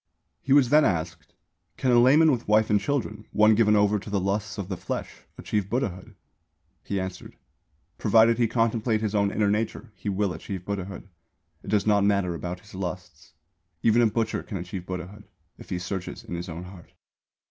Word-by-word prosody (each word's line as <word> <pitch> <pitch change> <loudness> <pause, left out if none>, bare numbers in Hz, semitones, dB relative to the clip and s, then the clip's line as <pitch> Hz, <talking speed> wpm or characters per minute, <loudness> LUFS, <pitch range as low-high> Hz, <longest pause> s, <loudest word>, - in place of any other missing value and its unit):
He 135 - -5
was 140 -2 +5
asked: 80 - +1 0.4
"Can 130 - +1
a 120 - +6
layman 150 +6 +6
with 120 -4 -2
wife 110 +1 +3
and 105 - +4
children, 110 -2 -3
one 110 +1 +5
given 105 -1 +4
over 105 0 +3
to 105 - -10
the 100 -1 0
lusts 100 +3 -2
of 100 -3 -4
the 95 - -3
flesh, - - -6
achieve 105 -2 -2
Buddhahood?" 105 -4 -3 0.7
He 100 - -2
answered: 95 0 -6 0.6
"Provided 115 +2 +4
he 120 - +3
contemplate 115 -1 0
his 110 -2 -2
own 100 -1 +2
inner 100 0 +1
nature, 110 +2 -2
he 100 - -5
will 100 -1 0
achieve 90 +3 -7
Buddhahood. 100 -1 -5 0.5
It - - -16
does 105 -2 +2
not 105 -2 +3
matter 100 -3 +2
about 90 +2 -5
his 105 +2 -17
lusts. 90 -4 -7 0.5
Even 115 +1 +4
a 115 - +5
butcher 110 +1 -1
can 100 - -6
achieve 90 +1 -7
Buddhahood, 95 +3 -7 0.3
if - - -13
he 90 - -2
searches 90 +1 -5
in - - -8
his 85 +1 -5
own 85 +2 -6
heart." 90 -1 -13
100 Hz, 185 wpm, -26 LUFS, 95-110 Hz, 0.7 s, a